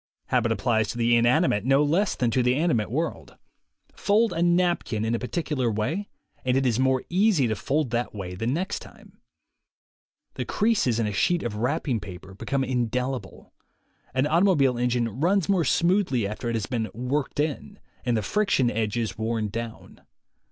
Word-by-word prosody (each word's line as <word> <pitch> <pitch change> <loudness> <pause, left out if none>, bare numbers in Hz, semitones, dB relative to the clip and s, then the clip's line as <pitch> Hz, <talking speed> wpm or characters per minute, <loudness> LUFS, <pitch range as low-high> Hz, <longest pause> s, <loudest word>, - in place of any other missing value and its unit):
Habit 120 -2 +2
applies 110 0 +1
to 120 - -5
the 120 0 +3
inanimate 120 - +3
no 135 +3 +4
less 170 +7 +1
than 120 -2 0
to 130 - +2
the 125 +1 +2
animate 145 -9 +1
world. 155 +8 -3 0.6
Fold 215 +2 +2
a 165 - -2
napkin 175 -11 +1
in 115 - 0
a 115 - 0
particular 130 -2 -1
way 145 - -2 0.3
and 130 0 +2
it 135 - +1
is 120 -2 +1
more 130 -1 +2
easy 185 - +3
to 110 - -1
fold 145 0 -1
that 120 +1 -1
way 95 -4 -6
the 110 +5 -3
next 170 +10 -1
time. - - -16 1.1
The - - -3
creases 210 - +1
in 115 - +1
a 105 - -2
sheet 175 - +1
of 110 -3 -3
wrapping 125 +1 0
paper 95 0 -10
become 135 +7 -2
indelible. 125 0 -3 0.6
An 130 +2 +1
automobile 155 -5 +3
engine 120 -1 +1
runs 185 +3 +2
more 190 -4 +2
smoothly 170 - +2
after 110 +3 -4
it 115 - -1
has 110 -3 -1
been 115 -4 -2
"worked 130 +4 -2
in," 145 - -2 0.3
and 120 -2 +1
the 110 - -1
friction 140 - +1
edges 110 +1 -2
worn 110 -1 -1
down. 115 +2 -7
125 Hz, 175 wpm, -25 LUFS, 115-160 Hz, 1.1 s, no